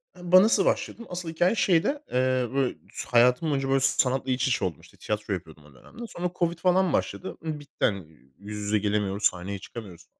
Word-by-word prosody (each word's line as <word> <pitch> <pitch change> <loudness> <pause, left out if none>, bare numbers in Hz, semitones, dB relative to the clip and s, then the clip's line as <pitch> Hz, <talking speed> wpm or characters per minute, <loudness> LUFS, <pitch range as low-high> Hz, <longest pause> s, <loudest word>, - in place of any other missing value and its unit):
Hı 180 0 -8
ba 185 0 +9
nasıl 215 -3 +3
başladım? 235 - -1
Asıl 175 -2 -5
hikâye 175 +6 +2
şeyde. 200 - +2
Eee, 130 -1 +1
böyle, 135 -2 0 0.3
hayatım 125 +6 +4
boyunca, 135 -1 -1
böyle, 135 0 +3
sanatla 130 0 +1
iç 125 +1 +1
içe 125 - +1
oldum, 80 -6 -4
işte, - - -19
tiyatro 105 -1 -3
yapıyordum 80 -4 -8
o 75 - -18
dönemde. 230 - -11
Sonra 175 -2 -4
covid 170 -1 +1
falan 185 0 +2
başladı. 185 - -2
Imm, 155 -2 -3
bitti 145 -1 -3
hani 100 -6 -1 0.3
yüz 105 +2 -8
yüze 105 +1 +1
gelemiyoruz, 105 0 -1
sahneye 95 +2 0
çıkamıyoruz. 95 -6 -10
130 Hz, 195 wpm, -26 LUFS, 105-175 Hz, 0.3 s, ba